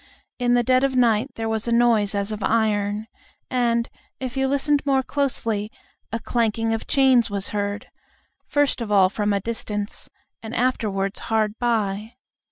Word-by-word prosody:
In 245 0 +3
the 240 - +3
dead 255 +2 +3
of 270 -1 +1
night 235 -1 +3
there 225 0 -3
was 220 +1 -2
a - - 0
noise 230 -4 +3
as 200 +1 -1
of 215 -1 -4
iron, 210 -1 +1 0.5
and, 235 -2 +1 0.3
if 260 -1 -5
you 270 0 +1
listened 280 +1 +1
more 270 -2 +2
closely, 230 -7 -1 0.4
a 230 - -2
clanking 225 -1 0
of 225 - -4
chains 260 -4 +4
was 200 -1 0
heard, 205 0 -3 0.6
first 290 -3 +1
of 220 -2 -4
all 195 -2 +5
from 210 0 0
a 200 - +1
distance, 210 -1 -4 0.3
and 220 +1 -7
afterwards 205 -6 0
hard 215 -2 +1
by. 220 -2 -1
225 Hz, 165 wpm, -23 LUFS, 210-250 Hz, 0.6 s, all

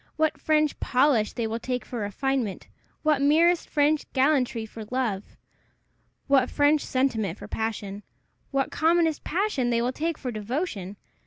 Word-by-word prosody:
what 315 0 0
French 305 -1 +2
polish 250 -5 +2
they 235 - -2
will 225 +1 -2
take 250 +1 -3
for 245 - -5
refinement! 220 +1 -2 0.4
what 305 -3 +3
merest 325 +4 +3
French 295 0 +1
gallantry 260 -5 +2
for 220 0 -9
love! 235 -6 -2 0.9
what 270 -2 +3
French 290 +1 +3
sentiment 225 -8 0
for - - -9
passion! 210 -2 -4 0.5
what 275 -1 -1
commonest 325 -1 +2
passion 340 - 0
they 235 -1 +2
will 245 +2 0
take 325 +2 -2
for 250 - -4
devotion! 215 - -4
260 Hz, 145 wpm, -26 LUFS, 225-305 Hz, 0.9 s, what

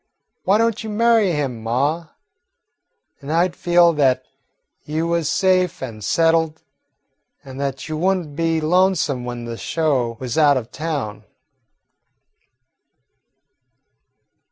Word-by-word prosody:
Why 195 +2 +4
don't 230 0 0
you 220 - -5
marry 225 -2 +3
him, 135 -7 -2
ma? 140 +9 -1 1.1
Then 140 - -9
I 170 +3 +3
'd 175 - -13
feel 175 -1 +4
that 130 -4 +2 0.6
you 155 +2 -2
was 170 -3 0
safe 185 -4 +1
an' 110 -4 -7
settled, 160 +6 +1 0.8
an' 135 -1 -10
that 135 0 -4
you 155 - -4
would 190 +4 +2
n't 155 -5 -8
be 165 0 0
lonesome 160 -6 +1
when 120 -1 -5
the 115 -1 -6
show 130 -8 -1
was 125 +3 -2
out 145 -3 +5
of 120 -2 -5
town." 145 -10 -4
155 Hz, 125 wpm, -20 LUFS, 130-175 Hz, 1.1 s, out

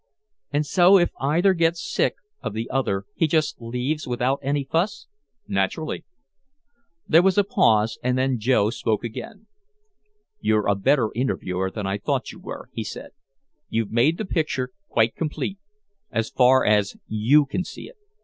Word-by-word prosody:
"And 145 +1 0
so 180 +6 +6
if 175 -2 +2
either 170 +8 +3
gets 165 -1 +1
sick - - +1 0.3
of - - -4
the 115 +2 -3
other 110 -7 -1
he 165 - +1
just 155 -4 0
leaves 125 +7 -3
without 125 +2 0
any 140 +1 0
fuss." 195 +8 -1 0.4
"Naturally." 100 +11 -2 1.0
There 165 +2 +6
was 190 +2 +2
a 205 - +6
pause. 115 - +2
And 125 0 0
then 130 -1 +1
Joe 110 -2 +2
spoke 110 -2 -1
again. 200 - -7 0.9
"You're 105 -1 +1
a 100 - +4
better 110 +4 +2
interviewer 95 -7 -1
than 105 +1 -5
I 95 +1 -2
thought - - -2
you - - -13
were," - - -9
he - - -3
said. - - -8 0.6
"You've 115 -2 -1
made 130 +9 +3
the 215 - -3
picture 155 -8 -1 0.2
quite 115 0 +2
complete 170 +5 -3 0.5
as 115 -1 -2
far 130 +1 +4
as 105 -1 +2
you 125 +8 +4
can 140 +6 -2
see - - -9
it. - - -16
130 Hz, 160 wpm, -23 LUFS, 110-165 Hz, 1.0 s, so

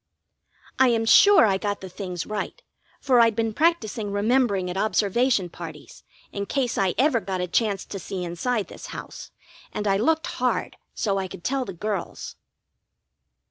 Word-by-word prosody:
I 260 - +6
am 230 -2 +2
sure 400 - +7
I 195 -2 +1
got 205 0 -2
the 190 - -7
things 180 -2 -5
right, 215 - -4 0.4
for 255 -3 +3
I'd 230 -2 +5
been 225 -1 -1
practising 230 -9 0
remembering 205 -2 +1
at 180 - -4
observation 215 +1 +1
parties, 165 -3 -10 0.3
in 200 0 -4
case 260 -4 -1
I 190 -2 +1
ever 265 -1 +3
got 190 -2 -4
a 180 - 0
chance 200 +1 0
to 195 - -7
see 185 -1 -5
inside 195 +6 -2
this - - -10
house; - - -8 0.4
and 210 - -3
I 195 0 +3
looked 320 +9 +1 0.2
hard - - 0 0.2
so 195 -3 0
I 190 - -3
could 175 - -11
tell 265 -1 -1
the 195 - -6
girls. 200 +1 -4
210 Hz, 170 wpm, -24 LUFS, 190-240 Hz, 0.4 s, sure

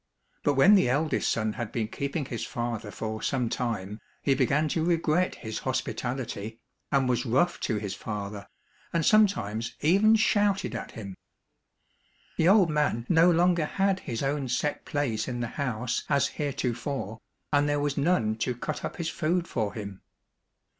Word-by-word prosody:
But 145 - +1
when 185 +10 +7
the 190 -11 +5
eldest 150 +5 +1
son 110 -1 0
had 115 -2 -5
been 110 -3 -1
keeping 140 +5 -3
his 115 -3 -4
father 120 -3 -3
for 110 +1 -5
some 125 -3 0
time 105 -4 -3 0.2
he 140 - +3
began 140 +4 +2
to 160 - 0
regret 170 +1 +1
his 110 -2 -5
hospitality, 125 -4 -3 0.3
and 135 -2 +3
was 125 -1 +1
rough 135 +9 +1
to 110 - -1
his 100 -2 -4
father, 100 -1 -6 0.4
and 165 -2 0
sometimes 120 - +2
even 200 +8 +5
shouted 205 -3 +2
at - - -6
him. 100 -4 -7 1.2
The 165 - +4
old 195 -5 +5
man 150 -6 0
no 170 +1 +6
longer 175 -1 +3
had 195 +3 +1
his 120 -5 -4
own 140 0 -1
set 145 +4 -1
place 120 -7 -1
in 125 -2 -3
the 120 -1 -2
house 125 -2 -1
as 140 -1 +3
heretofore, 130 -5 -3 0.3
and 145 0 +3
there 145 0 +1
was 145 -1 -1
none 140 -9 +1
to 125 +2 -1
cut 150 +5 -4
up - - -4
his 165 -2 -3
food 170 +2 0
for 105 -3 -2
him. 100 -3 -7
135 Hz, 165 wpm, -27 LUFS, 115-160 Hz, 1.2 s, when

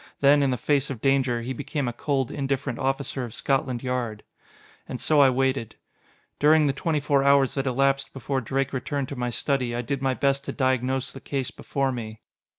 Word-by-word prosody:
Then, 145 +1 +5
in 140 - +2
the 125 - 0
face 145 +3 +1
of 130 -5 -5
danger, 130 -2 +1
he 130 +2 -3
became 140 +2 -3
a 120 - -2
cold, 135 0 -1
indifferent 135 -2 -2
officer 135 0 -1
of 120 -3 -7
Scotland 130 -3 -1
Yard. 120 -4 -3 0.7
And 125 - -4
so 155 -2 +3
I 135 - +7
waited. 130 -2 0 0.6
During 155 +1 +5
the 140 - +2
twenty 155 +3 -1
four 140 -1 +2
hours 140 -1 +4
that 135 -1 -2
elapsed 135 +2 +1
before 135 0 -2
Drake 135 +3 -1
returned 135 +1 -2
to 140 - -5
my 125 -1 -2
study, 125 -1 -1
I 120 - -2
did 135 +2 -3
my 135 -1 +1
best 140 0 +1
to - - -3
diagnose 130 0 0
the 135 - -11
case 135 -2 -3
before 135 -1 -2
me. 110 -3 -6
135 Hz, 200 wpm, -25 LUFS, 125-140 Hz, 0.7 s, I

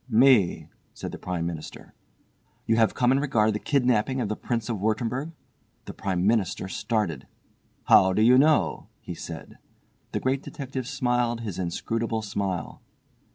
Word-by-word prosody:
"Me," 120 -5 +4 0.3
said - - -6
the - - -8
Prime 90 -2 -3
Minister. 85 -2 -7 0.7
"You 115 - +2
have 115 -1 +3
come 125 -1 +3
in 135 - +3
regard 110 -7 +2
the 105 - -2
kidnapping 130 -1 +1
of 115 -5 -1
the 110 - -1
Prince 115 -1 -3
of 115 -4 -2
Wurttemberg?" 115 - -1 0.5
The - - -7
Prime 95 -2 -2
Minister 100 -4 +1
started. 95 - -2 0.6
"How 95 - +6
do 105 +3 +2
you 125 +3 +6
know?" 155 +2 +2
he - - -7
said. - - -9 0.5
The - - -1
Great 130 +1 0
Detective 130 -4 -6
smiled 120 -4 0
his 105 -6 -5
inscrutable 110 +5 -2
smile. 100 -5 -3
115 Hz, 155 wpm, -26 LUFS, 100-125 Hz, 0.7 s, How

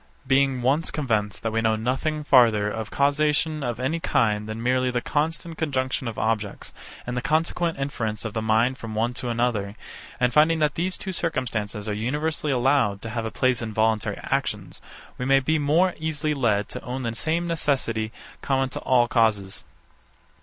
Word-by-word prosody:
But 130 - -21
being 135 -2 +3
once 145 +6 +2
convinced 110 - -1
that 115 - -1
we 115 - +1
know 110 0 +2
nothing 135 +7 -1
farther 115 -7 +5
of 110 0 -4
causation 150 +2 +1
of 120 -3 -3
any 140 +6 -1
kind 110 -8 +1
than 110 +1 -5
merely 130 +1 +2
the 125 -1 0
constant 160 +4 -2
conjunction 130 -4 -1
of 115 - -5
objects, 110 -2 -2 0.3
and 125 - -4
the 125 - -1
consequent 165 +2 0
inference 115 -6 -3
of 110 - -4
the 110 - -1
mind 110 +4 +2
from 110 -2 -6
one 115 +3 0
to 125 0 -4
another, 115 -4 -1 0.4
and 125 -1 +2
finding 155 +2 +5
that 150 -2 +2
these 180 +2 -2
two 190 - -5
circumstances 115 - -2
are 105 - -1
universally 150 +7 -1
allowed 125 -5 +2
to 115 - -5
have 115 -1 -3
place 130 -2 +2
in 110 -2 -5
voluntary 110 -1 +1
actions; - - -2 0.4
we 125 - -2
may 135 +1 +5
be 155 +4 +1
more 165 +6 +3
easily 155 -1 -1
led 105 -7 +1
to - - -6
own 130 +1 -4
the 115 -2 -2
same 160 +8 -1
necessity 130 -9 -1 0.3
common 135 -1 +1
to - - -5
all 125 -2 +3
causes. 110 -5 +1
125 Hz, 180 wpm, -25 LUFS, 110-150 Hz, 0.4 s, farther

